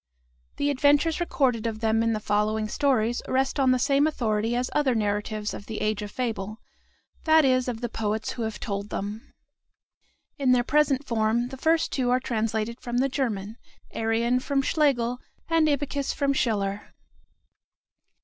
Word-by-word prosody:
The 285 0 0
adventures 290 +4 +3
recorded 255 -9 0
of 220 -1 -4
them 220 0 +2
in 230 0 +1
the 215 - -1
following 215 +1 0
stories 240 -2 +1
rest 265 +2 0
on 265 -1 +4
the 255 - +4
same 280 +3 +3
authority 225 -5 0
as 250 +1 -1
other 280 -4 +2
narratives 210 0 -2
of 200 - -9
the 220 - -5
"Age 215 0 -1
of 205 - -5
Fable," 215 -3 -3 0.7
that 315 -2 +5
is, 255 -1 +2
of 240 -2 -4
the 240 - -1
poets 220 -1 -2
who 240 - -6
have 220 -1 -3
told 200 -2 -4
them. 205 +3 -5 1.1
In 260 -2 +4
their 245 -1 +3
present 290 0 +2
form, 230 0 0
the 265 - -7
first 320 +4 +1
two 255 -3 0
are 250 +1 +3
translated 225 -1 -2
from 240 0 -3
the 270 +2 +2
German, 225 -6 -3 0.3
Arion 230 +2 +1
from 275 +1 0
Schlegel, 250 -6 +1 0.3
and 330 -1 +3
Ibycus 285 -1 -1
from 280 -1 +1
Schiller. 205 -5 -1
240 Hz, 165 wpm, -26 LUFS, 215-275 Hz, 1.1 s, that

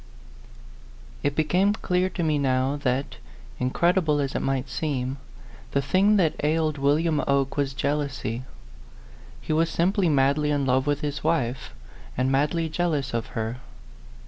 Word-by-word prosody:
IT 145 - -1
became 180 +7 +2
clear 185 -3 0
to 180 - -3
me 155 -2 +1
now 130 0 +1
that, 135 -1 -2 0.4
incredi 170 +8 +2
ble 150 -2 +1
as 140 -1 -1
it - - -1
might 135 -1 -1
seem, 130 0 -2 0.6
the 140 - +2
thing 195 +9 +3
that 175 -6 +3
ailed 155 -1 +1
William 150 +2 +2
Oke 140 -1 +1
was 140 -2 -1
jealousy. 140 -5 -2 1.0
He - - -2
was 165 +1 +2
simply 180 +2 +1
madly 140 +1 +2
in 145 -2 +1
love 130 +2 +1
with 145 0 0
his 145 -2 -3
wife, 125 - -1 0.4
and 130 +1 +1
madly 150 +4 +1
jealous 155 -5 -1
of 115 -1 -2
her. 115 +2 -2
145 Hz, 145 wpm, -25 LUFS, 135-160 Hz, 1.0 s, thing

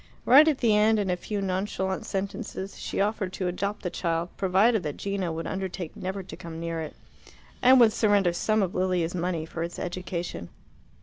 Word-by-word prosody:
Right 280 +6 +8
at 305 -4 +3
the 225 -5 +3
end, 215 +1 +4
in 200 -3 0
a - - +1
few 205 +3 -4
nonchalant 190 0 -2
sentences, 195 0 -4
she - - -4
offered 200 -2 0
to 185 - -2
adopt 200 +4 -3
the 180 - -2
child, 170 -1 -1
provided 200 +4 +3
that 150 -3 -4
Gino 195 -3 -2
would 165 +1 -4
undertake 190 -3 -4
never 190 +1 -4
to 185 - -9
come 165 -1 -8
near 165 -1 -3
it, 155 - -7 0.7
and 260 +1 +7
would 225 -3 +6
surrender 205 -6 +3
some 215 +4 +1
of 185 - -2
Lilia's 180 -2 0
money 175 -2 -2
for 165 0 -6
its 170 +1 -4
education. 175 - -4
190 Hz, 190 wpm, -27 LUFS, 175-205 Hz, 0.7 s, Right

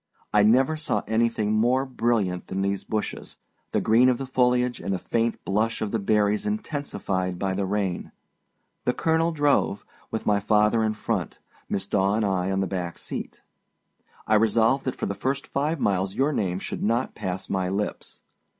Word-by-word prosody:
I 105 - +6
never 130 +9 +4
saw 130 -9 -1
anything 110 -1 +1
more 125 +5 +2
brilliant 115 -8 0
than 95 +1 -2
these 100 0 -1
bushes, 110 -1 -4 0.3
the - - +2
green 120 +4 +5
of 125 - +2
the 135 - -4
foliage 125 -1 +2
and - - -3
the 95 - +1
faint 115 +4 -1
blush 110 +3 0
of 105 -2 -2
the 115 - 0
berries 105 - +1
intensified 140 - -2
by 95 +1 -1
the 95 0 -1
rain. 95 -3 -2 0.7
The 125 - +1
colonel 165 +1 +2
drove, 145 -9 +1 0.2
with 110 - -4
my 105 -1 +3
father 105 +2 +3
in 110 0 0
front, - - -2 0.3
Miss 95 -1 -1
Daw 100 0 +1
and 110 -1 +1
I 95 -2 0
on 95 0 0
the - - +1
back 90 -3 -4
seat. - - -6 0.8
I 110 - +1
resolved 115 +4 +3
that 130 - -2
for - - -3
the 100 - -2
first 135 +7 -2
five 150 +3 -1
miles 95 -2 0
your 140 +3 +2
name 90 -7 0
should - - -5
not 115 +4 0
pass 95 0 -4
my 95 -1 -1
lips. 100 +2 -4
110 Hz, 180 wpm, -25 LUFS, 100-125 Hz, 0.8 s, I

